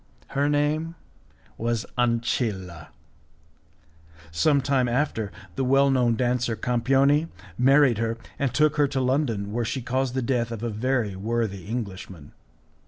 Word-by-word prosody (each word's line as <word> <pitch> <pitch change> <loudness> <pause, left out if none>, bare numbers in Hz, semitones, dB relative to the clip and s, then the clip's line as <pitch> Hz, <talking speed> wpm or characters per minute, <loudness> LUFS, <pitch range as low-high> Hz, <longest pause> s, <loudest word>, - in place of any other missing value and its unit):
Her 140 +1 0
name 150 +3 0 0.6
was 115 0 -1
Ancilla; 115 - -1 1.4
sometime 135 - +2
after, 120 -4 -1 0.2
the 135 - -1
well 135 +2 +4
known 125 -3 +2
dancer, 120 -1 0
Campioni, 135 +6 +2 0.3
married 130 0 +4
her 115 0 -1 0.2
and 140 -3 0
took 155 -1 +2
her 145 -1 +4
to 135 - -2
London, 125 -6 0
where 120 +1 0
she 130 +2 -3
caused 130 +1 -1
the 130 - 0
death 120 -1 0
of 115 -1 -5
a 120 - -2
very 115 -2 -1
worthy 105 -2 -2
Englishman. 95 -9 -6
125 Hz, 130 wpm, -25 LUFS, 115-135 Hz, 1.4 s, well